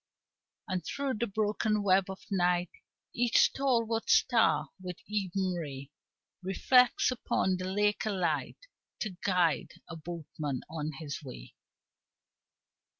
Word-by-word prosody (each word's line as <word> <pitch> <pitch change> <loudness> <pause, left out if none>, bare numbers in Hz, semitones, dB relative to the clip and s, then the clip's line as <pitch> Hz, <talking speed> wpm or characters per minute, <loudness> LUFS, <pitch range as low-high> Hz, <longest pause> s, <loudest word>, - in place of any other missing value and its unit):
And 185 -4 -2
through 270 - -3
the 235 - 0
broken 210 +1 0
web 190 -1 +3
of 190 - -7
night 180 -2 +1 0.4
Each 240 0 +2
stalwart 230 -4 +2
star 235 -3 +4
with 180 -2 -6
even 195 -2 -1
ray 140 -5 -6 0.5
Reflects 245 +8 +3
upon 190 -6 0
the 185 +1 -4
lake 210 +2 +1
a - - +1
light 165 -8 -1 0.4
To 205 -5 -3
guide 180 -5 +1
a 170 - -7
boatman 155 -4 -5
on 155 -1 -4
his 150 -4 -6
way. - - -10
185 Hz, 120 wpm, -30 LUFS, 165-215 Hz, 0.5 s, star